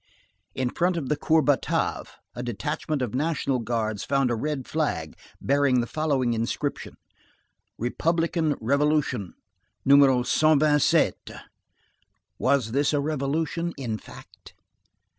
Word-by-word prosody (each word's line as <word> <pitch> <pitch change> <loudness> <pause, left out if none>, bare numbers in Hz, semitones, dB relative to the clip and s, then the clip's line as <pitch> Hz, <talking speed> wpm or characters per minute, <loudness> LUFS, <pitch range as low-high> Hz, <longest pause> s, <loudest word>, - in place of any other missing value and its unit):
In 130 -2 -1
front 175 +1 0
of 140 -6 -4
the 150 - +2
Cour 155 +2 +2
Batave, 145 -2 0 0.3
a 120 - -5
detachment 130 +5 -3
of 120 - -4
National 140 -2 0
Guards 110 -3 -2
found 135 -2 +1
a - - +1
red 140 +2 -3
flag 80 - -2 0.2
bearing 140 -2 +2
the 120 - 0
following 135 -4 0
inscription: 115 +5 -3 0.8
Republican 165 +4 0
revolution, 140 - 0 0.5
No. 140 +1 +7
127. 145 +3 +4 1.3
Was 130 -4 +1
this 140 +4 +1
a 145 - +2
revolution, 155 +4 -2
in 115 -5 -4
fact? - - -15
140 Hz, 115 wpm, -25 LUFS, 125-155 Hz, 1.3 s, No